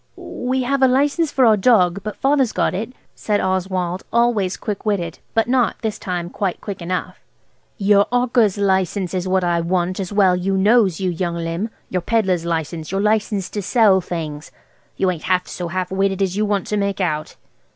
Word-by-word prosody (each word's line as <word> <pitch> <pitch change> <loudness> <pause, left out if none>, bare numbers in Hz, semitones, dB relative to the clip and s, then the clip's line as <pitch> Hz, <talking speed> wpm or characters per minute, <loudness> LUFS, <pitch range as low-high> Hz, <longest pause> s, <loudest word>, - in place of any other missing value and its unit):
"We 255 +1 -3
have 275 +2 0
a 265 - +6
license 285 +4 +1
for 260 - +3
our 220 -2 +6
dog, 195 -4 +3
but 215 0 -5
Father's 270 -3 +1
got - - 0
it," 215 +6 -4 0.2
said 210 -1 -1
Oswald, 185 -1 -1
always 230 -6 +1
quick 210 -3 -5
witted, 180 -6 -2 0.2
but 225 0 +2
not, 250 -2 +2
this 220 -2 -2
time, 175 -1 -4
quite 195 -3 -2
quick 200 -3 -7
enough. 180 +2 -4 0.6
"Your 200 -1 +4
'awker's 245 -4 +2
license 190 -2 0
is 185 0 -2
what 185 0 +1
I 170 -1 +1
want, 180 +2 -1
as 190 -1 -4
well 195 -3 +4
you 190 +2 -1
knows, 205 -3 +3
you 185 -2 0
young 170 0 -2
limb. 170 +5 -3 0.2
Your 180 - 0
pedlar's 190 -4 0
license–your 165 +2 -3
license 210 -2 0
to 205 - -3
sell 200 -2 +4
things. 155 -4 -5 0.5
You 190 -1 +2
ain't 170 -3 -7
half 180 0 +1
so 175 - -5
half 185 +1 -3
witted 195 0 +1
as 190 -1 -1
you 210 +1 0
want 200 -3 0
to 210 - -1
make 200 -1 -1
out." 155 -5 -2
195 Hz, 190 wpm, -20 LUFS, 180-215 Hz, 0.6 s, a